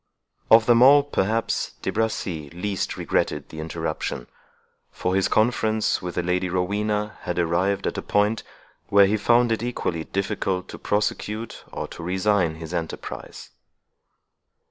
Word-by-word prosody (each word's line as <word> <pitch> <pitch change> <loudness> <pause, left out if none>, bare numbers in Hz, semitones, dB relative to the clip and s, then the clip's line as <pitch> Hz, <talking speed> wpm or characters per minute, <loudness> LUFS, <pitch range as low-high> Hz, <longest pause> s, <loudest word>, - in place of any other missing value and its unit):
Of 110 0 +7
them 120 0 +5
all, 140 +3 +8
perhaps, 115 -5 -1
De - - -1
Bracy 95 -9 -2
least 90 +3 -3
regretted - - -1
the 80 - -9
interruption; 80 -5 -4 0.6
for 90 - -2
his 95 0 +2
conference 110 -1 +1
with 90 -1 -5
the 90 - 0
Lady 90 +1 0
Rowena 105 +3 -1
had 90 - -3
arrived 90 +3 +1
at - - -1
a - - -3
point, 105 +2 +1 0.5
where 100 0 +6
he 100 +2 +2
found 120 +3 +3
it 110 - 0
equally 90 -9 -2
difficult 95 -2 -2
to - - -8
prosecute 105 +2 -2
or - - -4
to - - -9
resign 90 -1 +1
his 80 +1 -8
enterprise. 85 -2 -6
100 Hz, 145 wpm, -24 LUFS, 90-110 Hz, 0.6 s, all